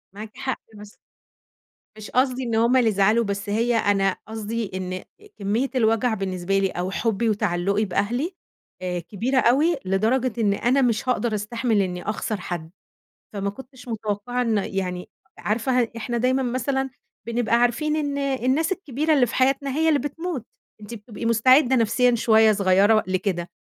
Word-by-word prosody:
معاكِ 215 +1 -9
حق 265 -1 -3
بس 210 0 -13 1.0
مش 215 -1 -9
قصدي 255 0 +1
إن 235 -2 -2
هُم 235 +3 +3
اللي 245 -3 +4
يزعلوا، 215 +3 +3
بس 200 +1 -4
هي 230 +3 +1
أنا 195 -3 +2
قصدي 220 0 -4
إن 185 0 -4 0.4
كمية 215 +7 -1
الوجع 225 0 +2
بالنسبة 190 -1 -1
لي 195 - +2
أو 180 +1 -3
حُبي 225 +2 0
وتعلّقي 200 0 0
بأهلي 220 - -1 0.5
آآ، 180 -1 -2
كبيرة 225 +10 -1
أوي 295 +9 +3
لدرجة 225 +6 0
إن 205 -3 +2
أنا 255 +6 +2
مش 240 +1 0
هاقدر 240 -3 0
أستحمل 215 0 0
إني 180 -1 -4
أخسر 210 -1 -3
حد، 170 -2 -5 0.6
فما 200 0 -2
كنتش 255 +3 -12
متوقعة 220 +2 -3
إن 225 -3 +1
يعني 185 -2 -3 0.3
عارفة 240 +2 0
إحنا 235 +2 -3
دايمًا 255 +3 +1
مثلًا 265 +2 -1 0.4
بنبقى 235 0 +1
عارفين 245 +6 +1
إن 285 -2 -2
الناس 275 +4 0
الكبيرة 310 -3 -1
اللي 270 -4 +4
في 230 - -6
حياتنا 275 +2 +2
هي 320 +1 +2
اللي 295 -2 +3
بتموت، 290 -2 -4 0.4
أنتِ 210 +2 -9
بتبقي 220 0 -8
مستعدة 255 +4 +4
نفسيًا 245 +1 +3
شوية 220 -1 +5
صغيرة 200 +2 +4
لكده، 185 -2 -2
225 Hz, 155 wpm, -23 LUFS, 200-255 Hz, 1.0 s, شوية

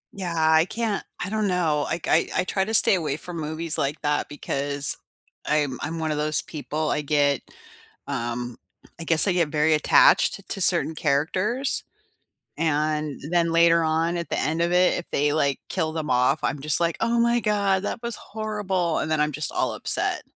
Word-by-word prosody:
Yeah, 185 -3 -4
I 160 0 +4
can't 220 0 -2 0.2
I 185 - -4
don't 215 0 0
know. 165 -6 +1
I 165 - -1
k 165 -1 +1
I - - +3
I - - -2
try 190 +1 -1
to 220 - -4
stay 220 - +6
away 155 -6 -1
from 175 +1 -8
movies 160 +1 -3
like 140 +2 -1
that 145 0 0
because 140 -1 -3 0.5
I'm 145 -4 0
I'm 160 +3 -4
one 160 -1 -1
of 150 - -2
those 150 0 +1
people, 155 0 -3
I - - 0
get, 145 -1 +1 0.7
um 120 -2 -4 0.4
I 165 - -6
guess 165 +3 +4
I - - +3
get 170 -3 +2
very 150 +1 +2
attached 155 +5 +4
to 195 - -4
certain 170 -3 +3
characters, 185 - 0 0.8
and 155 -2 -1
then 170 -1 +2
later 170 0 +5
on, 165 +2 0
at 170 -1 -4
the - - -1
end 160 +2 0
of 170 +1 0
it, 180 0 +3
if 175 - -7
they, 145 +1 +1
like, 140 -3 +1
kill 160 0 -1
them 155 -2 -4
off, 125 +4 +2
I'm 140 +1 -1
just 150 +3 +1
like, 170 -1 0
"Oh 235 +1 +1
my 235 +1 +2
god, 200 -3 +1
that 230 - -4
was 235 -1 -3
horrible," 200 -6 -2
and 155 - -2
then 155 -1 +1
I'm 150 0 +1
just 150 +2 -3
all - - 0
upset. - - -2
160 Hz, 195 wpm, -24 LUFS, 150-180 Hz, 0.8 s, stay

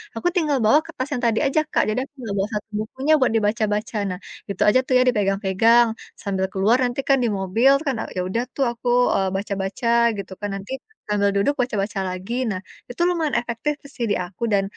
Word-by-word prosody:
aku 225 - -1
tinggal 305 -5 +2
bawa 285 +8 +6
kertas 315 -6 -5
yang 250 - -2
tadi 225 -1 +2
aja 275 +3 +2
Kak, - - +1
jadi 225 +4 0
aku - - -28
enggak 215 -4 -4
bawa 195 - +1
satu 210 +1 -4
bukunya 265 +8 0
buat 255 -4 +3
dibaca-baca. 215 0 0
Nah, 180 - -5 0.3
itu 195 - -5
aja 255 - +4
tuh 255 - 0
ya 250 - +5
dipegang-pegang 210 +2 +3 0.3
sambil 190 -2 -1
keluar 205 +6 +3
nanti 245 +2 -1
kan 270 - +6
di - - +2
mobil 225 +8 +3
kan 275 - +1
itu 225 - -3
kan, - - -12
ya - - +1
udah 230 +5 0
tuh 275 - +1
aku, 240 +1 -8 0.3
eee, 190 -1 +1
baca-baca 195 +3 -3 0.3
gitu 195 -1 -7
kan, 205 - -2
nanti 195 +5 -8 0.4
sambil 200 -1 +2
duduk 200 +9 +2
baca-baca 205 -4 -2
lagi. 185 +5 -5 0.2
Nah, 185 -3 -2 0.3
itu 245 - -5
lumayan 325 -4 0
efektif 240 +5 -2 0.2
sih 235 - -1
di - - +3
aku 180 +5 -8
dan 195 -1 +3
220 Hz, 210 wpm, -22 LUFS, 195-255 Hz, 0.4 s, bawa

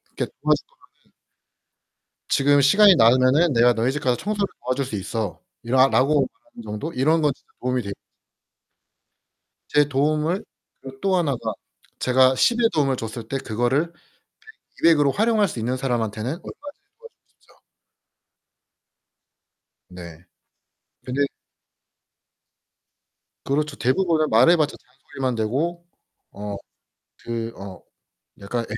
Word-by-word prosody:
그렇게 - - -3
도와 - - +3
줄 - - -10 0.3
거면은 - - -36 1.2
"지금 145 +1 +3
시간이 200 +7 +6
나면은 130 +7 +4
내가 120 0 +4
너희 115 +3 0
집 150 - -3
가서 125 -3 +1
청소를 205 -1 -2 0.2
도와줄 130 +2 -1
수 125 - -6
있어."라 115 +6 -1
라고 140 +3 +2 0.3
말하는 235 - -10
정도 125 +11 -5
이런 155 +6 +2
건 150 -2 +2
진짜 - - -33
도움이 125 0 -1
되 100 - -6 1.8
제 145 0 +3
도움을 150 +6 0 0.4
그리고 135 0 -11
또 190 -1 +2
하나가 145 -8 -1 0.5
제가 130 +1 +4
10의 235 - +3
도움을 135 -3 +1
줬을 115 -1 -7
때 135 - -2
그거를 125 +6 0 0.7
100, 165 - 0
200으로 145 -3 +4
활용할 215 - +2
수 125 - -7
있는 125 +3 -2
사람한테는 115 -4 -2
얼마든지 170 +5 -8 0.4
도와주고 470 0 -13 0.3
싶죠. - - -26 2.3
네. 85 -1 -11 0.8
근데 130 +3 -1 2.2
그렇죠. 150 +1 -1
대부분은 155 +3 +1
말해 125 +10 +5
봤자 150 -2 0
잔소리만 130 0 -6
되고 150 +11 -2 0.5
어 105 0 -6 0.7
그 115 -1 -4
어 95 -1 -9 0.6
약간 115 +4 -3
130 Hz, 250 characters per minute, -22 LUFS, 120-155 Hz, 2.3 s, 시간이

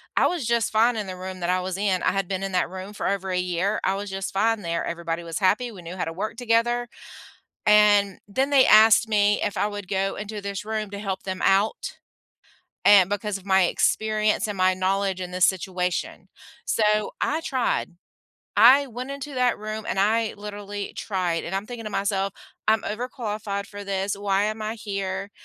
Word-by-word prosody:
I - - +4
was 345 -8 -2
just 235 -1 +1
fine 230 +3 +3
in 210 -3 -3
the 185 - -5
room 185 0 -7
that 175 0 -2
I 185 0 +2
was 185 0 -4
in, 195 -2 0
I - - +3
had 195 -1 -1
been 190 0 -3
in 195 - -3
that 180 -1 0
room 190 +2 -8
for - - -3
over 195 -1 -1
a 180 - 0
year, 180 +3 -1
I 190 - +1
was 200 +1 -5
just 195 0 -4
fine 220 +2 +1
there, 170 -2 -2
everybody 170 0 -4
was 165 -1 -5
happy, 215 +5 +2
we 195 -5 -11
knew 170 +2 -7
how - - -1
to 165 - -5
work 210 +5 -4
together, 240 0 +1 0.8
and 205 -2 +5
then 260 +7 0
they 275 -2 +6
asked 220 +1 +6
me 205 -1 +3
if 205 - -2
I - - +1
would 205 -2 -6
go 195 0 -1
into 210 0 -6
this 200 -1 -5
room 215 -1 -3
to 200 - -6
help 195 -2 -4
them 190 -1 -4
out, 195 +3 +1 0.9
a 200 -2 +8
because 205 0 -2
of 195 - -18
my 190 -1 +4
experience 215 +4 +1
and 205 -2 -4
my 185 0 +3
knowledge 190 0 0
in 180 - -6
this 180 0 +3
situation. 180 -1 -2 0.4
So, 210 -1 +1
I 310 +2 +1
tried, 260 - -1 0.6
I 255 +7 +7
went 250 +2 -7
into 280 0 -6
that 250 -1 +1
room, 215 +1 -5
and - - -2
I 220 +2 +2
literally 205 -1 -6
tried, 180 -5 -2
and 175 - -5
I'm 195 +2 -2
thinking 240 -1 -7
to 215 - -5
myself, 195 -1 -1 0.4
"I'm 220 0 +4
overqualified 210 -3 -4
for 205 0 -9
this. 195 0 -2
Why 200 0 +1
am 215 +1 -3
I 215 +1 -3
here?" 195 -2 -4
205 Hz, 205 wpm, -24 LUFS, 190-215 Hz, 0.9 s, a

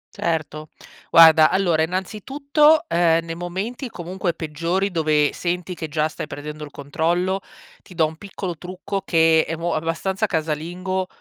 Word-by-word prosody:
Certo. 155 -2 -3 0.4
Guarda 160 -2 +8
allora, 175 -5 +2
innanzitutto, 280 - +1
ehm, 165 -1 +2
nei 165 - -5
momenti 190 - -5
comunque 180 -2 -4
peggiori 170 +5 -2
dove 155 -3 +2
senti 180 +1 -3
che 160 -2 -6
già 155 +1 0
stai 155 - -7
perdendo 150 +2 -7
il 150 - -8
controllo, 170 +7 -1 0.4
ti 180 - -15
do 160 -2 +3
un 155 +1 -6
piccolo 190 -3 -6
trucco 185 +3 -5
che 160 -2 +4
è 165 - -4
mo 170 +1 -2
abbastanza 180 +6 -1
casalingo, 175 +3 -2
170 Hz, 145 wpm, -22 LUFS, 160-190 Hz, 0.4 s, Guarda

